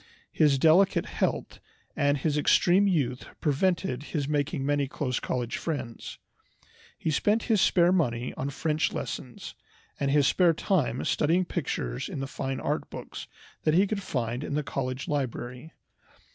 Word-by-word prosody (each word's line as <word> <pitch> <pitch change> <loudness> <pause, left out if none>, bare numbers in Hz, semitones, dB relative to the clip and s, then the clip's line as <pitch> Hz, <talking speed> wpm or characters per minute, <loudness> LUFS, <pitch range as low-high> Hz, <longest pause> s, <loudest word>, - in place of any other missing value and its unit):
His 150 -3 +3
delicate 165 +7 +4
health - - -2 0.4
and 145 0 +2
his 145 +2 0
extreme 180 +6 +4
youth 135 -9 0
prevented 165 -2 0 0.2
his 140 -2 -1
making 145 -1 -1
many 145 -1 +1
close 130 -2 -2
college 125 -2 -2
friends. 140 -8 -5 0.8
He 160 - -1
spent 210 +9 +2
his 220 -5 +2
spare 175 -2 +4
money 125 -9 0
on 135 - -3
French 155 +2 -1
lessons, 125 -4 -6 0.5
and 140 - 0
his 145 0 +4
spare 170 +2 +4
time 155 - 0
studying 170 +5 +2
pictures 65 - -3
in - - -5
the 135 - -2
fine 135 -1 -4
art - - -2
books - - -8 0.3
that 155 0 +2
he 190 +3 +5
could 200 0 -3
find 125 - -3
in 145 - -3
the 150 - 0
college 130 -1 -3
library. 130 0 -3
145 Hz, 150 wpm, -27 LUFS, 130-170 Hz, 0.8 s, he